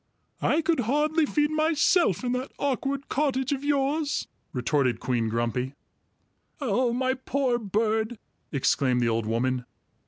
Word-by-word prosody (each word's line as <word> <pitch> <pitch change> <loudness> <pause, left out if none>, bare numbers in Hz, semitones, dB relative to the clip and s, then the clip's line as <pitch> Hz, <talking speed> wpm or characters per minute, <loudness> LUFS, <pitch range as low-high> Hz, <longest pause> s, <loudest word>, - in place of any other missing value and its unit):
"I 320 +2 +2
could 330 -3 +2
hardly 300 +6 +2
feed 295 +1 +1
myself 310 - +3
in 245 - 0
that 250 +2 -2
awkward 275 0 -1
cottage 265 -2 0
of 280 -1 -1
yours!" 290 +1 0 0.2
retorted 125 0 +1
Queen 120 -3 0
Grumpy. 120 +4 -1 0.8
"Oh, 250 -2 +1
my 260 +2 +1
poor 260 -1 0
bird!" 220 +2 0 0.3
exclaimed 135 -3 +2
the 120 - +2
old 115 -1 -1
woman. 125 +3 0
250 Hz, 130 wpm, -26 LUFS, -, 0.8 s, myself